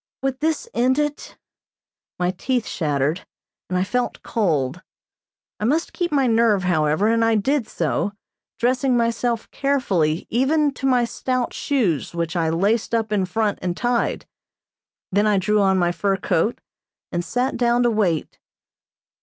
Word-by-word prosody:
Would 270 Hz, -1 st, -1 dB
this 320 Hz, +8 st, -1 dB
end 255 Hz, +3 st, +2 dB
it? 295 Hz, -1 st, -3 dB, 0.8 s
My 180 Hz, 0 st, +1 dB
teeth 245 Hz, +3 st, -1 dB
shattered, 150 Hz, +1 st, -1 dB, 0.5 s
and 185 Hz, -, 0 dB
I 180 Hz, -, +2 dB
felt 245 Hz, +5 st, -2 dB
cold. 165 Hz, -, 0 dB, 0.8 s
I 210 Hz, -, -1 dB
must 310 Hz, +8 st, 0 dB
keep 350 Hz, -1 st, -2 dB
my 275 Hz, -3 st, +2 dB
nerve, 225 Hz, -4 st, +3 dB
however, 155 Hz, +2 st, +2 dB
and 230 Hz, 0 st, +3 dB
I 225 Hz, 0 st, +3 dB
did 260 Hz, +4 st, +1 dB
so, 165 Hz, +5 st, -1 dB, 0.4 s
dressing 250 Hz, +1 st, +2 dB
myself 235 Hz, 0 st, 0 dB
carefully 195 Hz, -, 0 dB
even 285 Hz, +4 st, +2 dB
to 270 Hz, 0 st, -2 dB
my 250 Hz, -2 st, +3 dB
stout 250 Hz, +1 st, -2 dB
shoes 195 Hz, -, -1 dB
which 170 Hz, 0 st, -2 dB
I 165 Hz, -2 st, +1 dB
laced 205 Hz, +8 st, +1 dB
up 225 Hz, -2 st, -1 dB
in 200 Hz, -3 st, +1 dB
front 215 Hz, +2 st, -1 dB
and 180 Hz, -1 st, -2 dB
tied. 240 Hz, 0 st, 0 dB, 0.9 s
Then 205 Hz, +3 st, +2 dB
I 210 Hz, -1 st, +3 dB
drew 210 Hz, +3 st, +2 dB
on 190 Hz, -1 st, +3 dB
my 175 Hz, -1 st, +2 dB
fur 195 Hz, +2 st, 0 dB
coat 195 Hz, +4 st, 0 dB, 0.5 s
and 175 Hz, 0 st, -1 dB
sat 250 Hz, +7 st, -1 dB
down 240 Hz, 0 st, +2 dB
to 240 Hz, -, +3 dB
wait. 185 Hz, -8 st, -1 dB
220 Hz, 155 wpm, -22 LUFS, 180-250 Hz, 0.9 s, nerve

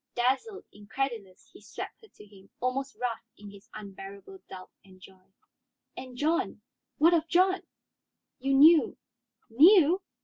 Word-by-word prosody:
Dazzled, 265 Hz, -, -1 dB
incredulous, 210 Hz, -2 st, -6 dB
he -, -, -16 dB
swept -, -, -9 dB
her 440 Hz, -, -18 dB
to 210 Hz, -, -18 dB
him, 195 Hz, -1 st, -19 dB
almost 265 Hz, +2 st, -3 dB
rough 245 Hz, -2 st, -3 dB, 0.2 s
in 205 Hz, -1 st, -12 dB
his 200 Hz, -1 st, -17 dB
unbearable 200 Hz, -, -11 dB
doubt 185 Hz, -1 st, -11 dB
and 185 Hz, -1 st, -19 dB
joy. 190 Hz, 0 st, -19 dB, 0.6 s
"And 255 Hz, -1 st, -10 dB
John? 330 Hz, +7 st, -2 dB, 0.3 s
What 330 Hz, +3 st, +4 dB
of 330 Hz, -1 st, +1 dB
John?" 370 Hz, +3 st, +2 dB, 0.8 s
"You 270 Hz, +1 st, 0 dB
knew 310 Hz, +1 st, +5 dB, 0.3 s
" 230 Hz, -1 st, -46 dB
"Knew? 345 Hz, -, +5 dB
255 Hz, 140 wpm, -28 LUFS, 200-325 Hz, 0.8 s, knew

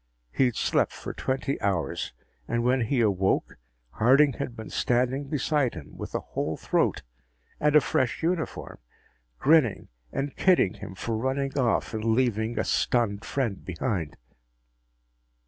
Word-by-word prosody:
He'd 125 Hz, -, +2 dB
slept -, -, +1 dB
for -, -, -7 dB
twenty 135 Hz, +1 st, -2 dB
hours. 90 Hz, -9 st, -1 dB, 0.4 s
And 120 Hz, 0 st, 0 dB
when 125 Hz, +1 st, +2 dB
he 125 Hz, +1 st, +1 dB
awoke, 95 Hz, -3 st, +1 dB, 0.3 s
Harding 135 Hz, -, +4 dB
had 120 Hz, -, -5 dB
been 110 Hz, -2 st, -8 dB
standing 125 Hz, +3 st, +1 dB
beside 145 Hz, -, 0 dB
him, 80 Hz, -4 st, -10 dB
with -, -, -7 dB
a -, -, +1 dB
whole -, -, -3 dB
throat -, -, 0 dB, 0.6 s
and 150 Hz, 0 st, +2 dB
a 150 Hz, -, +8 dB
fresh 130 Hz, +3 st, 0 dB
uniform, 170 Hz, -1 st, -2 dB, 0.6 s
grinning 145 Hz, -, +3 dB, 0.2 s
and 140 Hz, 0 st, -3 dB
kidding 180 Hz, -, +3 dB
him 95 Hz, -2 st, -9 dB
for 115 Hz, +4 st, -3 dB
running 135 Hz, +4 st, -1 dB
off 125 Hz, -4 st, +1 dB
and 110 Hz, -1 st, -3 dB
leaving 115 Hz, -1 st, +1 dB
a -, -, +1 dB
stunned 110 Hz, -4 st, +1 dB
friend 115 Hz, -9 st, -2 dB
behind. 90 Hz, -, -3 dB
120 Hz, 140 wpm, -27 LUFS, 110-135 Hz, 0.6 s, a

